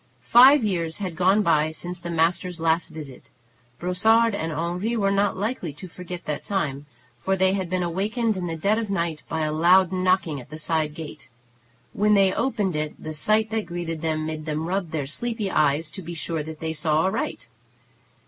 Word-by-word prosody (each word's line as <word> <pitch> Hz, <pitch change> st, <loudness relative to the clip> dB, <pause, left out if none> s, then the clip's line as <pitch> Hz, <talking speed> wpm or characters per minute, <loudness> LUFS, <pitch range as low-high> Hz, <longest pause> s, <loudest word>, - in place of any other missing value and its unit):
Five 260 Hz, +3 st, +7 dB
years 170 Hz, -6 st, -1 dB
had 185 Hz, -5 st, -4 dB
gone 190 Hz, +5 st, +3 dB
by 155 Hz, -3 st, +3 dB
since 175 Hz, +3 st, -4 dB
the 175 Hz, -, -7 dB
master's 170 Hz, +1 st, 0 dB
last 165 Hz, +1 st, +1 dB
visit. 145 Hz, -5 st, -10 dB, 0.5 s
Brossard 220 Hz, -, +3 dB
and 165 Hz, -4 st, -2 dB
Henri 175 Hz, +8 st, -2 dB
were 195 Hz, -2 st, +2 dB
not 200 Hz, 0 st, +1 dB
likely 200 Hz, -, -3 dB
to 165 Hz, +6 st, -9 dB
forget 180 Hz, 0 st, -8 dB
that 150 Hz, -, -3 dB
time, 145 Hz, -8 st, -2 dB, 0.3 s
for 190 Hz, -, 0 dB
they 190 Hz, 0 st, +3 dB
had 190 Hz, -3 st, -2 dB
been 185 Hz, 0 st, 0 dB
awakened 210 Hz, +6 st, -1 dB
in 180 Hz, -2 st, -3 dB
the 165 Hz, -, -3 dB
dead 200 Hz, +7 st, +1 dB
of 220 Hz, -3 st, -4 dB
night 170 Hz, -5 st, -1 dB
by 160 Hz, -, -2 dB
a 155 Hz, 0 st, 0 dB
loud 175 Hz, +3 st, +5 dB
knocking 185 Hz, -6 st, +1 dB
at 125 Hz, -, -16 dB
the 155 Hz, -, -8 dB
side 155 Hz, -1 st, -1 dB
gate. 155 Hz, -6 st, -9 dB, 0.6 s
When 210 Hz, +1 st, +3 dB
they 195 Hz, -2 st, +4 dB
opened 210 Hz, -, -1 dB
it 150 Hz, 0 st, -2 dB
the 155 Hz, -, -7 dB
sight 215 Hz, +7 st, +1 dB
that 220 Hz, -4 st, -2 dB
greeted 170 Hz, -2 st, -4 dB
them 155 Hz, -1 st, -1 dB
made 155 Hz, 0 st, -5 dB
them 155 Hz, +1 st, -2 dB
rub 185 Hz, -1 st, -2 dB
their 155 Hz, -3 st, -3 dB
sleepy 220 Hz, -, -3 dB
eyes 150 Hz, +1 st, +2 dB
to 195 Hz, -, -7 dB
be 170 Hz, 0 st, -7 dB
sure 165 Hz, 0 st, -2 dB
that 155 Hz, +1 st, -8 dB
they 160 Hz, 0 st, -2 dB
saw 155 Hz, 0 st, +1 dB
aright. 190 Hz, -, -2 dB
175 Hz, 195 wpm, -24 LUFS, 155-195 Hz, 0.6 s, Five